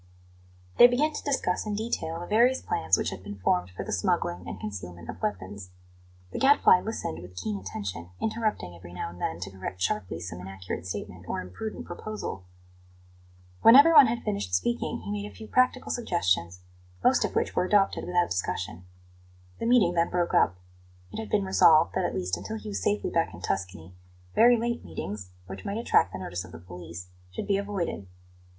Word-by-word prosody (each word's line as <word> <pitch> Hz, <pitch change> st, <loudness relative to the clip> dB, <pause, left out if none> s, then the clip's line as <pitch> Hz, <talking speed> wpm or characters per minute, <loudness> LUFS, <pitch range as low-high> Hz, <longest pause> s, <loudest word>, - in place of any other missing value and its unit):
They 240 Hz, -, +11 dB
began 290 Hz, +6 st, +1 dB
to -, -, -5 dB
discuss 265 Hz, -9 st, 0 dB
in 210 Hz, -, -1 dB
detail 205 Hz, -7 st, -2 dB
the 175 Hz, -, -6 dB
various 240 Hz, +7 st, +4 dB
plans 90 Hz, +3 st, +1 dB
which -, -, -1 dB
had 90 Hz, -, -7 dB
been 100 Hz, +1 st, -8 dB
formed 90 Hz, -1 st, +1 dB
for 90 Hz, -, -6 dB
the -, -, -5 dB
smuggling 85 Hz, 0 st, 0 dB
and 95 Hz, -, -6 dB
concealment 90 Hz, -4 st, -7 dB
of 90 Hz, -, -13 dB
weapons. 95 Hz, -2 st, -4 dB, 0.6 s
The -, -, -4 dB
Gadfly 270 Hz, -9 st, +6 dB
listened 85 Hz, -, -4 dB
with 90 Hz, +1 st, -12 dB
keen 100 Hz, +3 st, -3 dB
attention, 90 Hz, -2 st, -6 dB
interrupting 215 Hz, -, -2 dB
every 85 Hz, 0 st, -12 dB
now 90 Hz, -, -4 dB
and 90 Hz, -, -13 dB
then 80 Hz, -, -2 dB
to 95 Hz, +2 st, -5 dB
correct 95 Hz, -1 st, -7 dB
sharply 90 Hz, -2 st, -1 dB
some 85 Hz, +1 st, -7 dB
inaccurate 95 Hz, -1 st, -6 dB
statement 90 Hz, -2 st, -6 dB
or -, -, -2 dB
imprudent 90 Hz, -, -6 dB
proposal. 215 Hz, -, -6 dB, 1.2 s
When 230 Hz, -, +9 dB
everyone 290 Hz, -1 st, +9 dB
had 235 Hz, +1 st, -2 dB
finished 100 Hz, -2 st, -1 dB
speaking, 240 Hz, -, -1 dB
he 205 Hz, -, -6 dB
made 205 Hz, 0 st, -4 dB
a -, -, -18 dB
few 220 Hz, -, -10 dB
practical 255 Hz, +1 st, +2 dB
suggestions, 90 Hz, -, 0 dB, 0.4 s
most -, -, +4 dB
of -, -, -2 dB
which -, -, 0 dB
were -, -, +2 dB
adopted 195 Hz, 0 st, +2 dB
without 175 Hz, -1 st, +1 dB
discussion. 90 Hz, -1 st, -3 dB, 0.7 s
The -, -, -1 dB
meeting 230 Hz, -8 st, +5 dB
then 170 Hz, 0 st, +2 dB
broke 175 Hz, -1 st, 0 dB
up. 90 Hz, -, +4 dB, 0.6 s
It -, -, -5 dB
had 220 Hz, -, -5 dB
been 205 Hz, -2 st, +1 dB
resolved 165 Hz, -4 st, +5 dB
that, 185 Hz, -, 0 dB
at -, -, -2 dB
least 90 Hz, 0 st, -1 dB
until 100 Hz, +5 st, -5 dB
he 105 Hz, 0 st, -8 dB
was 100 Hz, -2 st, -3 dB
safely 100 Hz, +2 st, 0 dB
back -, -, 0 dB
in -, -, -12 dB
Tuscany, 90 Hz, -3 st, -3 dB, 0.4 s
very 240 Hz, +2 st, +6 dB
late 235 Hz, +1 st, -2 dB
meetings, 95 Hz, -2 st, -6 dB, 0.2 s
which 95 Hz, +1 st, -8 dB
might 200 Hz, -, -3 dB
attract 230 Hz, -, +3 dB
the 95 Hz, -, -5 dB
notice 90 Hz, -1 st, -4 dB
of 85 Hz, -, -13 dB
the -, -, -7 dB
police, 90 Hz, 0 st, -9 dB, 0.2 s
should 90 Hz, -, -5 dB
be 200 Hz, -, +2 dB
avoided. 195 Hz, -, -3 dB
100 Hz, 190 wpm, -27 LUFS, -, 1.2 s, They